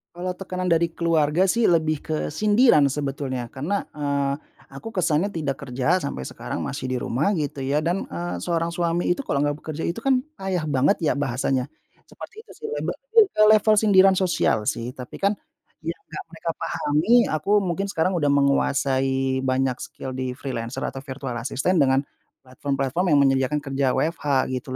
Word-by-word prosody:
Kalau 180 +1 -4
tekanan 185 -1 -3
dari 170 0 +2
keluarga 165 +2 +2
sih 230 +2 +2
lebih 160 -2 +2
ke 155 - -3 0.2
sindiran 210 - +4
sebetulnya 135 -3 -3
karena, 170 +10 -2 0.2
eee, 140 -1 0 0.4
aku 180 +12 -9
kesannya 185 +2 +1
tidak 145 -4 -2
kerja 130 +8 +1
sampai 140 - -4
sekarang - - -5
masih 135 -1 -4
di 130 0 -1
rumah 150 - 0
gitu 145 -5 -3
ya 145 +3 +1
dan, 175 +4 -1
eee, 85 +1 -5
seorang 165 - -1
suami 170 0 -1
itu 220 +10 0
kalau 140 - 0
gak 145 0 0
bekerja 155 0 -6
itu 170 - -2
kan 260 -2 +3 0.2
payah 185 -5 -2
banget 145 +7 +2
ya 160 - +2
bahasanya. 130 -1 0 0.4
Seperti 440 +2 -11
itu - - -15
sih 450 - -4
lebe 465 - -2
mmm, 460 -3 +4
ke 215 - +1 0.2
level 215 +1 +3
sindiran 195 -3 +5
sosial 175 - +1
sih 120 +2 -4
tapi 125 -1 -9
kan 200 +1 +2 0.5
yang 165 +1 -4 0.2
gak - - -5
mereka 165 0 -4
pahami 150 +7 -1 0.2
aku 155 +5 -3
mungkin 195 0 -1
sekarang 185 +1 0
udah 150 -5 +1
menguasai 135 -1 +1
banyak 130 -1 0
skill 130 - -7
di 130 0 -4
freelancer 120 -3 -4
atau 135 - -5
virtual 135 -2 -6
assistant 145 +6 +1
dengan 135 +1 +3 0.4
platform-platform 135 +5 -2
yang - - +5
menyediakan 135 +2 +2
kerja 135 0 0
WFH 145 -4 +1
gitu 130 +1 -4
150 Hz, 170 wpm, -23 LUFS, 135-180 Hz, 0.5 s, sindiran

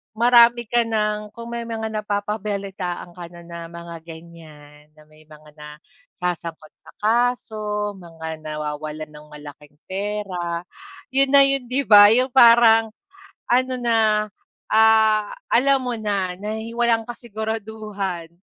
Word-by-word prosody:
marami 235 0 +5
ka 240 +1 +2
nang, 210 -2 -2
kung 235 0 -9
may 235 0 -4
mga 225 -1 -4
napapabalitaan 200 -4 -4
ka 175 - -8
na 175 - -13
na 170 0 -9
mga 170 0 -9
ganyan, 155 -3 -14
na 155 - -19
may 155 0 -21
mga 155 0 -16
nasasangkot 155 +2 -8
sa - - -15
kaso, 215 -2 -1
mga 160 -3 -8
nawawalan 150 0 -5
ng 150 0 -15
malaking 150 0 -13
pera, 190 -4 -4 0.5
'yon 270 0 +2
na 280 -1 +7
'yon, 275 -2 0
'di 260 +3 0
ba? 205 0 +9
'Yung 255 +3 +2
parang 230 -3 +6 0.6
ano 255 +1 +2
na, 235 -2 +1 0.7
ah, 220 -1 +4 0.2
alam 270 +2 +3
mo 250 -1 -3
na 200 -4 -2
nahi 220 +2 -5
walang 235 -1 +2
kasiguraduhan 215 -6 -5
210 Hz, 125 wpm, -22 LUFS, 170-230 Hz, 0.7 s, ba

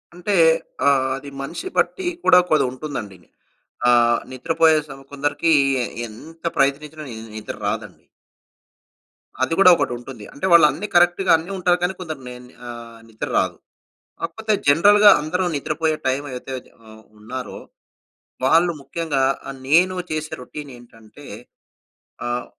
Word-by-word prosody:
అంటే 195 +3 -2 0.5
ఆహ్, 135 -2 +3
అది 140 +1 -9
మనిషి 170 - -6
బట్టి 375 -2 0 0.2
కూడా 180 - +7
కొది 155 - +4
ఉంటుందండి. 130 -8 -7 0.7
ఆహ్, 120 -1 +4
నిద్రపోయే 160 +4 +2
సం 135 - -10
కొందరికి 145 +3 +1 0.5
ఎంత 160 +10 -14
ప్రయత్నించినా 150 +3 0
ని 115 - -7 0.2
నిద్ర 110 - -6
రాదండి. - - -5 1.4
అది 165 - 0
గూడా 185 -2 +8
ఒకటి 165 - -1
ఉంటుంది. 120 -3 -10
అంటే 145 - -5
వాళ్ళు 170 -2 +8
అన్ని 195 +10 -5
కరెక్ట్‌గా 175 +2 +4
అన్ని 165 +4 -8
ఉంటారు. 180 -1 +2
కానీ, 180 +2 0
కొందరు 160 -6 -6
నే 125 - -8
ని 125 - -18
ఆహ్, 115 -1 -10
నిద్ర 110 -1 -6
రాదు. - - 0 0.6
కాకపోతే, 215 +6 -2
జనరల్‌గా 205 +8 +6
అందరూ 180 +5 -1
నిద్రపోయే 155 +2 -1
టైమ్ 135 +2 -1
ఏదైతే 130 +1 -7 0.3
ఆహ్, 110 0 -15 0.2
ఉన్నారో 125 +4 -7 0.9
వాళ్ళు 165 +5 +4
ముఖ్యంగా 145 0 -2 0.3
ఆహ్, 135 - -7
నేను 180 +6 +4 0.2
చేసే 155 0 -3
రొటీన్ 145 +3 -9
ఏంటంటే 115 +3 -17 1.0
ఆహ్, 120 0 -2
145 Hz, 135 wpm, -21 LUFS, 125-170 Hz, 1.4 s, గూడా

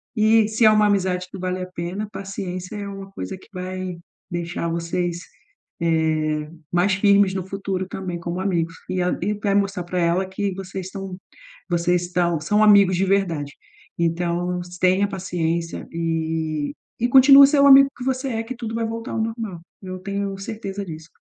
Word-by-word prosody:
E 220 0 +4
se 220 +1 +2
é 215 - +8
uma 210 0 +4
amizade 185 -2 0
que 195 - -8
vale 185 0 -3
a 185 - -4
pena, 185 +5 -4
paciência 190 -1 -6
é 200 -1 -5
uma 195 0 -8
coisa 190 -1 -6
que - - -19
vai 185 -1 -5 0.3
deixar 170 0 -3
vocês, 170 +1 -2 0.6
eh, 155 -2 0 0.2
mais 180 +3 +2
firmes 200 -1 +4
no 190 -2 -3
futuro 195 -1 -3
também 185 -3 -5
como 170 +1 -4
amigos, 170 -4 0 0.2
e 185 - -1
a 180 - +1
e 205 +3 0
vai 200 -1 -1
mostrar 195 -2 0
pra 180 +1 -3
ela 175 +2 +2
que 195 +1 -2
vocês 190 -1 -6
estão 195 -1 -7 0.5
vocês 175 0 +1
estão 175 -2 0
são 210 +7 +2
amigos 200 -3 +6
de 195 - +2
verdade, 170 -7 0 0.5
então 175 +1 0 0.2
tenha 185 +2 +3
paciência, 170 -3 -3
e 160 -2 -2 0.3
e 240 - +2
continua 275 +2 +9
a - - +4
ser 285 0 +2
o 280 - +7
amigo 275 0 +9
que 250 - -6
você 265 +1 -1
é 225 -2 -2
que 255 +3 -6
tudo 225 -2 -6
vai 230 0 -1
voltar 230 +1 -5
ao 225 - -1
normal. 220 -6 -4 0.2
Eu 185 0 -6
tenho 200 0 -3
certeza 200 -1 -5
disso. 160 -1 -9
185 Hz, 180 wpm, -22 LUFS, 175-205 Hz, 0.6 s, continua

